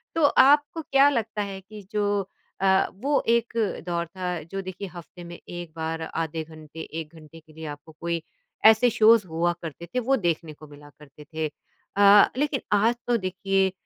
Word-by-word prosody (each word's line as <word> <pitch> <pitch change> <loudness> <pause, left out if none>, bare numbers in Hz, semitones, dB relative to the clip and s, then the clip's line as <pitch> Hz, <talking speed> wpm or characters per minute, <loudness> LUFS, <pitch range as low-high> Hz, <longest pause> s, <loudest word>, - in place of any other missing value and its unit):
तो 325 - +1
आपको 290 +3 +4
क्या 275 -1 +4
लगता 225 -5 -2
है 195 -1 -6
कि 210 +2 -12
जो 205 -2 0 0.3
अ, 190 0 +4 0.2
वो 285 0 +2
एक 235 -1 +2 0.3
दौर 170 -1 -1
था, 180 0 -4
जो 195 +4 -6
देखिए 185 +1 -7
हफ़्ते 175 +1 -11
में 170 0 -9
1 175 -2 -7
बार, 160 0 -3
आधे 160 0 -3
घंटे, 155 0 -13
1 160 0 -7
घंटे 160 +1 -14
के 155 -1 -21
लिए। 160 0 -9
आपको 145 +1 -9
कोई 170 -1 -2 0.4
ऐसे 220 +3 +7
शोज़ 225 -2 +5
हुआ 170 +1 0
करते 165 +1 -7
थे - - +3
वो 265 +3 +2
देखने 165 -4 -2
को 155 +1 -14
मिला 145 0 -14
करते 150 0 -15
थे। 155 -1 -1 0.5
अ, 205 0 +7
लेकिन 290 -2 0 0.2
आज 230 +4 +3
तो 240 -1 +3
देखिए 190 0 0
185 Hz, 180 wpm, -25 LUFS, 160-220 Hz, 0.5 s, ऐसे